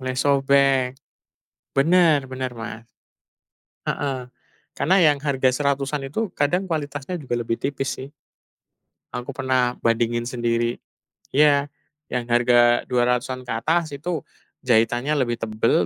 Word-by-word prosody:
Mulai 130 Hz, 0 st, -3 dB
sobek. 140 Hz, -1 st, +3 dB, 0.9 s
Bener 160 Hz, -1 st, +4 dB
bener 130 Hz, 0 st, -3 dB
Mas. 115 Hz, 0 st, -8 dB, 1.0 s
Heeh. 130 Hz, -3 st, -2 dB, 0.5 s
Karena 185 Hz, +6 st, +3 dB
yang 150 Hz, -4 st, +4 dB
harga 135 Hz, -3 st, +2 dB
Rp100.000-an 140 Hz, +1 st, -1 dB
itu 215 Hz, +5 st, -2 dB
kadang 145 Hz, +6 st, +1 dB
kualitasnya 145 Hz, +1 st, -3 dB
juga 130 Hz, -5 st, -3 dB
lebih 115 Hz, -1 st, -2 dB
tipis 135 Hz, -1 st, -2 dB
sih. 135 Hz, -, -8 dB, 1.0 s
Aku 125 Hz, 0 st, -5 dB
pernah 130 Hz, -2 st, +1 dB
bandingin 115 Hz, +1 st, +1 dB
sendiri. 120 Hz, -1 st, -1 dB, 0.6 s
Iya. 145 Hz, -1 st, +4 dB, 0.4 s
Yang 125 Hz, -1 st, -1 dB
harga 120 Hz, 0 st, +4 dB, 0.3 s
Rp200.000-an 125 Hz, +1 st, 0 dB
ke -, -, -4 dB
atas 160 Hz, +3 st, 0 dB
itu 160 Hz, +2 st, -3 dB, 0.4 s
jahitannya 120 Hz, +4 st, +2 dB
lebih 120 Hz, -3 st, 0 dB
tebel, 110 Hz, -4 st, +1 dB
130 Hz, 115 wpm, -23 LUFS, 120-145 Hz, 1.0 s, Bener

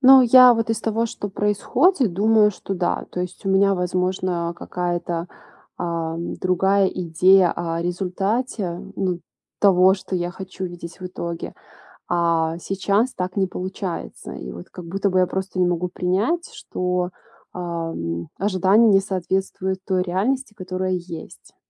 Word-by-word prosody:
Но 265 Hz, 0 st, +9 dB
я 250 Hz, 0 st, +8 dB
вот 225 Hz, -1 st, -1 dB
из 225 Hz, -, -1 dB
того, 225 Hz, +1 st, 0 dB
что 205 Hz, -2 st, -5 dB
происходит, 215 Hz, -, +2 dB
думаю, 210 Hz, +2 st, +4 dB
что 195 Hz, 0 st, -5 dB
да. 175 Hz, -1 st, -1 dB
То 180 Hz, -, -4 dB
есть 180 Hz, +2 st, -6 dB
у -, -, +1 dB
меня, 195 Hz, +1 st, +4 dB
возможно, 180 Hz, -1 st, -1 dB
какая-то, 175 Hz, -1 st, -3 dB, 0.5 s
ам, 165 Hz, -1 st, -3 dB
другая 190 Hz, +2 st, +2 dB
идея 180 Hz, +1 st, +4 dB
о 165 Hz, -1 st, -2 dB
результате, 190 Hz, +2 st, -2 dB, 0.2 s
ну, 180 Hz, -2 st, -1 dB, 0.4 s
того, 190 Hz, -1 st, +6 dB
что 190 Hz, -1 st, -4 dB
я 175 Hz, 0 st, -2 dB
хочу 190 Hz, 0 st, -7 dB
видеть 175 Hz, -1 st, -8 dB
в 185 Hz, -, -6 dB
итоге. 170 Hz, -2 st, -5 dB, 0.5 s
А 165 Hz, -1 st, +1 dB
сейчас 200 Hz, +6 st, 0 dB
так 180 Hz, 0 st, -4 dB
не 195 Hz, -1 st, +2 dB
получается. 185 Hz, 0 st, -5 dB
И 65 Hz, -1 st, -7 dB
вот 85 Hz, -, -10 dB
как 180 Hz, -, -10 dB
будто 195 Hz, +4 st, -1 dB
бы 185 Hz, -, +2 dB
я 185 Hz, -, +3 dB
просто 190 Hz, 0 st, -3 dB
не 180 Hz, -, +4 dB
могу 175 Hz, 0 st, -1 dB
принять, 200 Hz, -, 0 dB
что, 180 Hz, 0 st, -2 dB, 0.4 s
эм, 165 Hz, -, -4 dB
ожидание 195 Hz, +3 st, +4 dB
не 195 Hz, -1 st, +5 dB
соответствует 190 Hz, 0 st, -2 dB
той 185 Hz, -2 st, +1 dB
реальности, 210 Hz, +8 st, -1 dB
которая 185 Hz, -2 st, -3 dB
есть. 175 Hz, -2 st, -8 dB
185 Hz, 145 wpm, -22 LUFS, 175-200 Hz, 0.5 s, Но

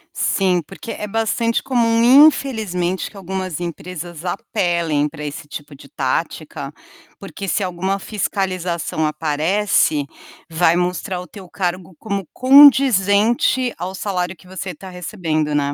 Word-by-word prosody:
Sim, 185 Hz, -3 st, +1 dB
porque 230 Hz, -, -9 dB
é 210 Hz, -, -5 dB
bastante 225 Hz, +2 st, 0 dB
comum, 240 Hz, +3 st, +6 dB
infelizmente, 190 Hz, -, -1 dB
que 205 Hz, -, -14 dB
algumas 185 Hz, -3 st, -4 dB
empresas 175 Hz, 0 st, -7 dB
apelem 170 Hz, -5 st, 0 dB
para 150 Hz, 0 st, -9 dB
esse 145 Hz, 0 st, -6 dB
tipo 145 Hz, 0 st, -9 dB
de -, -, -15 dB
tática, -, -, -3 dB, 0.5 s
porque 200 Hz, -, -7 dB
se 200 Hz, -, 0 dB
alguma 190 Hz, +2 st, -2 dB
fiscalização 185 Hz, -6 st, -2 dB
aparece, 155 Hz, +1 st, +1 dB, 0.5 s
vai 165 Hz, 0 st, +3 dB
mostrar 180 Hz, +1 st, -2 dB
o 180 Hz, -, -10 dB
teu 190 Hz, +1 st, -12 dB
cargo 180 Hz, -2 st, -3 dB
como 200 Hz, -4 st, -4 dB
condizente 255 Hz, -3 st, +5 dB
ao 185 Hz, +2 st, -5 dB
salário 185 Hz, -2 st, -2 dB
que 180 Hz, -, -20 dB
você 190 Hz, 0 st, -6 dB
está 185 Hz, +3 st, -11 dB
recebendo, 165 Hz, -4 st, -2 dB
né. 145 Hz, -1 st, 0 dB
185 Hz, 130 wpm, -19 LUFS, 170-210 Hz, 0.5 s, comum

